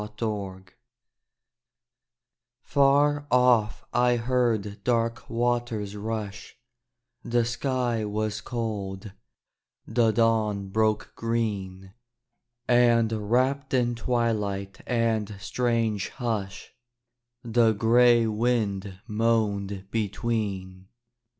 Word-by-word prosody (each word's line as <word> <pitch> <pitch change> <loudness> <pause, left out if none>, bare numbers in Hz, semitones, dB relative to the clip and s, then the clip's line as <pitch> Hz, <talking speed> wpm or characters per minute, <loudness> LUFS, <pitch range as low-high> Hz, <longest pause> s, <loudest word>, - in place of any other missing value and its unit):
AT 105 0 -11
DAWN 100 -4 -4 2.0
Far 145 +1 +3
off 125 -5 +3
I 125 0 +3
heard 115 -4 0
dark 115 -1 0
waters 120 -3 -1
rush: 105 -1 -5 0.7
The 120 0 +1
sky 120 -2 -1
was 105 0 -2
cold: 105 -4 -4 0.7
the 115 -2 +2
dawn 110 -3 +1
broke 110 +1 0
green: 100 -5 -3 0.7
And 120 -2 +4 0.2
wrapped 135 +3 +1
in 120 -1 +2
twilight 105 -5 -2
and 110 -4 0
strange 115 -1 -1
hush 105 -5 -4 0.7
The 115 -1 +3
gray 120 +2 +4
wind 105 -4 -1
moaned 105 -3 -1
between. 100 -4 -3
115 Hz, 80 wpm, -26 LUFS, 105-120 Hz, 2.0 s, And